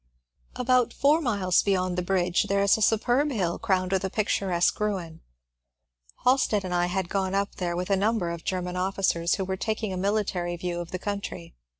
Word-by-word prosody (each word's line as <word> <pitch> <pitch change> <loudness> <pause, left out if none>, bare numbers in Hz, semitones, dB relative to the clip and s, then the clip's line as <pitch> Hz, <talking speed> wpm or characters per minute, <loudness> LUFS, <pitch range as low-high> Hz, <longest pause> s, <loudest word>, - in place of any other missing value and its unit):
^ - - -10
About 250 -1 +2
four 295 +4 +3
miles 200 - +2
beyond 185 -2 0
the 180 - 0
bridge 180 -1 +1
there 200 0 +2
is 200 - +5
a 220 - -4
superb 240 +7 +2
hill 185 -10 -1
crowned 185 -4 0
with 190 0 +1
a 190 - -1
picturesque 190 -4 0
ruin. 185 -6 -3 1.0
Halstead 250 -6 +2
and 180 - -3
I 175 0 +2
had 185 0 -2
gone 190 0 -1
up 200 0 -1
there 175 -2 -2
with 180 +3 -3
a - - +5
number 200 -3 0
of 170 -1 -6
Grerman 180 -1 -3
officers 180 -2 +1
who 195 - -3
were 190 0 -3
taking 215 0 -2
a - - -3
military 185 -3 -1
view 175 0 -3
of 170 -1 -6
the 185 - -3
country. 200 - -5
190 Hz, 200 wpm, -26 LUFS, 180-210 Hz, 1.0 s, is